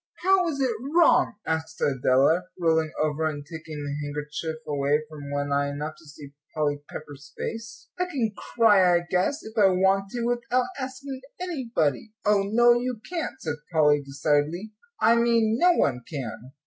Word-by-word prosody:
"How 375 -1 +4
is 295 -4 -2
it 260 -3 +2 0.2
wrong?" 340 -8 +5
asked 160 0 -3
Adela, 135 +6 +3
rolling 160 -2 +2
over, 155 +1 0
and 145 -2 -5
taking 160 -2 -7
the 145 0 -3
handkerchief 150 +2 -4
away 145 +1 +1
from 145 -2 -9
one 145 0 -2
eye 140 0 +1
enough 150 +2 -4
to 165 - -18
see 145 -1 -12 0.2
Polly 145 -2 0
Pepper's 140 -2 -10
face. 230 0 -6
"I 360 - +2
can 250 - -2
cry, 205 -8 +4
I 175 - -3
guess, 190 - 0
if 220 0 -10
I 210 -4 +6
want 190 +1 +2
to, 240 -1 -2
without 245 +1 0
asking 265 0 -6 0.2
anybody." 230 - -1
"Oh, 210 -1 +4
no, 240 +4 +5
you 245 -1 -2
can't," 335 -3 -4
said 155 -2 -3
Polly, 150 -3 +4
decidedly. 145 +7 -1 0.3
"I 230 +1 +5
mean 230 -1 +2
no 355 0 +6
one 125 - +1
can." 125 -3 -6
170 Hz, 165 wpm, -26 LUFS, 145-235 Hz, 0.3 s, I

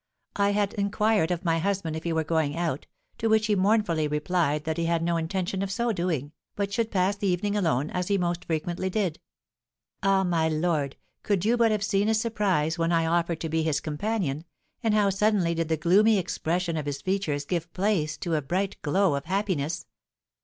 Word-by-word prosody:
I 200 0 +2
had 205 -1 0
inquired 205 -2 +1
of 180 0 -2
my 165 -1 +2
husband 185 -3 -1
if 160 - -6
he 170 - 0
were 160 -1 +1
going 160 -1 0
out, 165 -5 -2 0.3
to 225 - 0
which 220 -1 +3
he 215 -1 +2
mournfully 190 -6 +2
replied 150 0 0
that 160 +1 -2
he 170 - 0
had 165 0 +1
no 170 0 +1
intention 180 +3 -2
of 195 - -2
so 235 +3 0
doing, 170 - -2 0.2
but 200 0 -2
should 230 -1 0
pass 190 0 +1
the 200 0 -2
evening 195 +3 0
alone, 155 -7 +1
as 180 0 -2
he 200 - +2
most 175 -1 -1
frequently 170 +3 -2
did. 185 -5 -1 0.8
Ah, 195 0 +3
my 165 -3 +1
lord, 155 -3 0 0.3
could 200 -2 0
you 230 +2 +4
but 235 -1 +4
have 210 -2 0
seen 200 0 +1
his 220 0 +2
surprise 190 -8 0
when 165 +1 +1
I 165 -1 +2
offered 170 0 0
to 165 - -2
be 160 +1 +1
his 155 -3 +1
companion, 155 -2 -2 0.4
and 225 -3 +2
how 205 -2 +3
suddenly 195 -3 +2
did 165 -1 -2
the 160 - +1
gloomy 205 +8 +4
expression 170 -1 -1
of 150 -1 -3
his 140 -1 -3
features 185 -7 -1
give 170 +1 -3
place 185 -6 0
to 170 -3 -3
a 155 - +2
bright 185 +8 -2
glow 185 +3 +2
of 140 0 -3
happiness! 175 -4 -1
175 Hz, 205 wpm, -26 LUFS, 160-200 Hz, 0.8 s, you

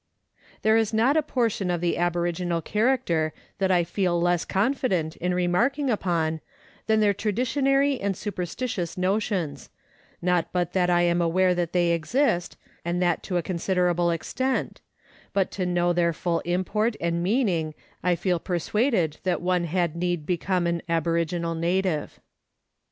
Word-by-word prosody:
There 220 +1 +5
is 220 -1 +1
not 245 +6 +3
a 315 - +4
portion 230 -9 -1
of 175 -1 0
the 170 0 0
aboriginal 175 0 0
character 175 - +1 0.3
that 190 -1 +1
I 180 -2 +4
feel 175 0 0
less 175 0 +1
confident 195 - 0
in 180 +1 -1
remarking 240 +11 +1
upon 165 -6 0 0.5
than 220 -1 +3
their 205 -1 +4
traditionary 270 +6 +1
and 195 -2 -1
superstitious 185 -2 -4
notions, 185 - -1 0.5
not 180 -1 0
but 180 -1 -1
that 180 -2 +2
I 175 0 +3
am 175 0 +2
aware 180 +2 +3
that 175 -2 -1
they 175 -1 +2
exist, 175 - 0 0.3
and 175 +1 -1
that 175 -2 +1
to 180 - -2
a 175 - 0
considerable 175 -1 +1
extent, 255 +11 -2 0.5
but 195 -2 +1
to 185 -2 -2
know 175 0 +2
their 170 -1 +2
full 170 +1 -1
import 205 +6 0
and 170 0 -1
meaning 180 - 0 0.3
I 180 0 +2
feel 175 0 0
persuaded 180 - 0
that 185 -2 0
one 180 -1 0
had 170 -1 0
need 175 -2 -1
become 180 +1 0
an 170 -1 0
aboriginal 170 +1 0
native. 170 -1 -1
180 Hz, 150 wpm, -25 LUFS, 170-205 Hz, 0.5 s, There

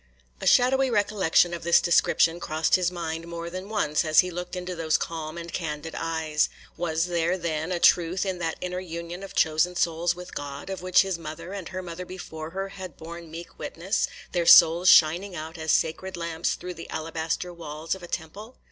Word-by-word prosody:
A - - -2
shadowy 265 +2 +4
recollection 205 -6 +2
of 170 - -4
this 170 +1 +5
description 170 -1 +3
crossed 160 -1 -1
his 180 -2 +4
mind 165 -2 -5
more 170 0 -6
than 185 +2 -6
once, 175 -9 +1
as 155 -1 +6
he 180 - -5
looked 180 +1 -5
into 180 0 -4
those 160 -1 +1
calm 160 -1 -5
and 170 0 -7
candid 160 -1 -4
eyes. 160 -2 0 0.3
Was 165 -1 0
there, 175 0 0
then, 165 -1 -2
a 180 - 0
truth 175 +2 +3
in 190 -2 -2
that 165 -2 -2
inner 180 0 -3
union 170 0 -6
of 195 - -9
chosen 160 +3 +2
souls 170 0 +1
with 180 0 -10
God, 145 +5 -6
of 190 - -5
which 185 +1 +4
his 190 -3 -3
mother 165 +3 -7
and 195 -4 -6
her 185 0 -5
mother 175 +1 -7
before 160 -4 -7
her 195 +3 -4
had 185 -5 -9
borne 170 0 -9
meek 165 +2 -10
witness,—their 175 -1 -2
souls 170 +3 +8
shining 175 +5 +5
out 160 +1 -6
as 160 -1 0
sacred 185 +3 0
lamps 170 -1 -2
through 180 0 -7
the 165 -1 -10
alabaster 165 +2 -3
walls 160 -1 -5
of 190 - -7
a 175 - -8
temple? 200 +9 -6
170 Hz, 195 wpm, -26 LUFS, 160-180 Hz, 0.3 s, souls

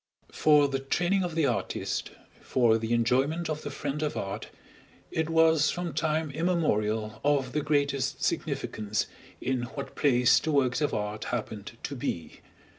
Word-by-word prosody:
For 150 -2 +5
the 135 -1 -2
training 175 +8 +1
of 175 -3 -3
the 160 -2 +3
artist, - - -2 0.3
for 115 -3 +3
the 110 +1 -3
enjoyment 135 +8 +1
of 155 0 -3
the 145 - -5
friend 145 +1 -4
of 150 -1 -1
art, 95 0 -4 0.6
it 160 0 -1
was 160 -2 +4
from 175 -2 -3
time 155 -1 0
immemorial 110 -10 0
of 140 -3 +2
the 150 - 0
greatest 140 -2 0
significance 105 -1 -1 0.3
in 130 -1 -1
what 140 - -5
place 125 -3 +4
the 160 - -2
works 135 -1 +2
of 150 - +1
art 105 0 -3
happened 110 -3 -4
to 140 - -4
be. 85 -9 -4
140 Hz, 155 wpm, -28 LUFS, 120-155 Hz, 0.6 s, For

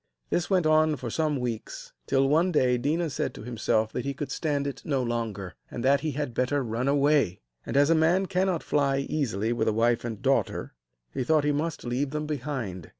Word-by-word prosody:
This 175 - 0
went 185 -4 +2
on 155 0 +4
for 125 -4 -6
some 155 0 0
weeks, 120 -3 -5
till, 135 0 +3
one 165 +6 +3
day, 125 -6 +2
Déna 155 +5 0
said - - -2
to - - -9
himself 110 -2 0
that 125 - -2
he 140 0 -3
could 140 0 -5
stand 145 -3 -1
it 140 - -4
no 135 -3 0
longer, 115 -6 -3 0.2
and 120 - -5
that 140 +1 +5
he 155 -2 -2
had 145 -3 -3
better 130 +3 0
run 120 +2 -2
away; 140 -8 +3 0.3
and, - - -1
as 145 +3 +5
a - - +7
man 165 +4 +3
cannot 185 -2 0
fly 140 -2 +1
easily 120 -6 -1
with 120 - -1
a 110 - +2
wife 115 +2 +2
and 115 -3 -5
daughter, - - 0 0.4
he - - -1
thought 155 +3 +3
he 150 - +2
must 155 +3 -2
leave 125 +4 -1
them 150 +2 -3
behind. 130 - -4
140 Hz, 210 wpm, -27 LUFS, 120-155 Hz, 0.4 s, a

